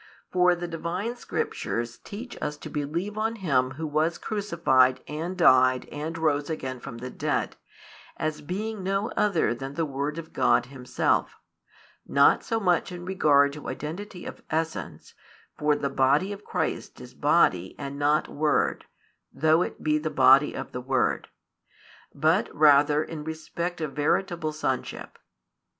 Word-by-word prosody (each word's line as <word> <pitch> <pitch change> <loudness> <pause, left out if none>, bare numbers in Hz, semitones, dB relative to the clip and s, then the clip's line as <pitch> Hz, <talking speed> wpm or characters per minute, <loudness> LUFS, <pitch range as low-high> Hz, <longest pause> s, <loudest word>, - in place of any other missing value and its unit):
For 180 -1 +4
the 175 0 -5
Divine 170 +8 -3
Scriptures 120 - -3
teach 235 +5 -8
us 150 - -3
to - - -9
believe 170 +9 -3
on 225 +1 0
Him 140 - +1
Who 160 - -3
was 155 +2 0
crucified 150 -11 +2
and 165 +5 -4
died 130 -6 +5
and 155 +3 -4
rose 145 -2 0
again 130 -5 -4
from 120 -1 -8
the 125 +2 -7
dead, - - -2 0.6
as 155 -1 -2
being 205 +6 -4
no 195 +3 -1
other 190 - +1
than 135 +3 -7
the 165 - 0
Word 145 +2 -3
of 165 -1 -8
God - - +3
Himself; 130 -1 -1 0.7
not - - +4
so 225 -1 -1
much 180 -3 +1
in 175 0 -7
regard 145 -6 +3
to 150 - -7
identity 180 +5 -6
of - - -8
essence, 160 0 -3 0.4
for 150 0 +2
the 145 - -2
body 140 +8 +2
of 205 +1 -10
Christ - - -3
is - - -11
body 90 +1 +2
and 140 0 -6
not 150 +1 +2
Word, 150 +1 0 0.5
though 160 +2 +3
it - - -4
be 155 0 +2
the 155 +1 -2
body 140 0 +5
of - - -6
the 125 - -5
Word; 130 0 0 0.8
but 160 +7 +2
rather 150 0 +5
in 155 -2 -7
respect 170 +2 -4
of 150 -3 -3
veritable 160 +1 0
sonship. 135 -4 -4
155 Hz, 150 wpm, -26 LUFS, 140-175 Hz, 0.8 s, died